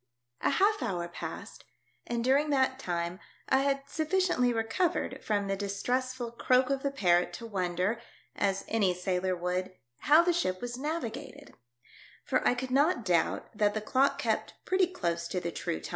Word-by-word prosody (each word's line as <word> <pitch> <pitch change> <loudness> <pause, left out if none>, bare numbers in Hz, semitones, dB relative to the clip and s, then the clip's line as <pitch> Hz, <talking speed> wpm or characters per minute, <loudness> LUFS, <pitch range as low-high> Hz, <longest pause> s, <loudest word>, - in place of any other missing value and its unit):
A - - +2
HALF 405 +8 +3
HOUR 180 -8 -2
passed, - - -7 0.4
and 235 -1 -1
during 275 +4 +3
that 265 -2 +2
time 175 -4 -3 0.3
I 265 - +4
had 275 0 +1
sufficiently 315 -4 +1
recovered 235 +11 -1
from 205 -2 0
the 195 0 -1
distress 225 +6 -1
ful 240 -2 -5
croak 255 +2 +2
of 275 -1 0
the 280 - 0
parrot 180 -10 +2
to 230 - -7
wonder, 190 +1 -1 0.3
as 195 -1 0
any 200 -5 +2
sailor 180 0 -1
would, 180 +1 -2 0.2
how 310 +3 +6
the 350 0 +2
ship 185 - 0
was 245 +2 -4
navigated; 290 -3 -5 0.7
for - - +1
I - - +3
could 255 +1 -4
not 280 - +3
doubt 175 +4 0
that 205 0 +2
the - - +1
clock 265 +6 +2
kept - - -1
pretty 370 -1 +3
close 170 - -2
to 180 - -2
the 170 -1 -3
true 80 - -3
tim. - - -8
235 Hz, 175 wpm, -30 LUFS, 185-275 Hz, 0.7 s, how